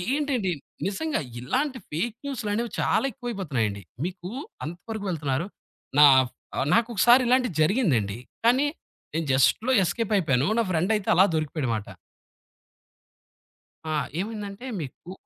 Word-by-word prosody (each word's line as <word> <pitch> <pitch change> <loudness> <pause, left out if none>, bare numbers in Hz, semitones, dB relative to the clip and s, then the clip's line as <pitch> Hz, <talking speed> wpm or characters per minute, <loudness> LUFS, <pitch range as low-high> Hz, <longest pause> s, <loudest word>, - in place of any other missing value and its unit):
ఏంటండి 265 -10 0 0.3
నిజంగా 300 +11 -1 0.2
ఇలాంటి 260 - -1
ఫేక్ 210 +9 -2
న్యూసులనేవి 235 -4 -2
చాలా - - +2
ఎక్కువైపోతున్నాయండి. 140 - -3 0.2
మీకు 180 0 -7 0.4
అంత 165 +3 -5 0.2
వరకు 215 -2 -5
వెళ్తున్నారు 150 -1 -1 0.5
నా 150 - +11 0.2
ఫ్ - - -35 0.2
ఆహ్, - - +1
నాకొకసారి 235 +2 +5
ఇలాంటిది 250 -6 +2
జరిగిందండి. 140 - +1 0.3
కానీ 255 +5 +4 0.5
నేను 165 0 -1
జస్ట్‌లో 175 - +3
ఎస్‌కేప్ 210 +5 -1
అయిపోయాను. 140 -6 +2
నా - - +2
ఫ్రెండ్ 175 +5 +1
అయితే 210 - -5
అలా 190 +3 +7
దొరికిపోయాడుమాట. 140 -8 -2 2.1
ఆ! - - +1 0.2
ఏమైందంటే 210 +2 -5 0.2
మీకు 150 +5 -9
195 Hz, 120 wpm, -26 LUFS, 150-240 Hz, 2.1 s, నా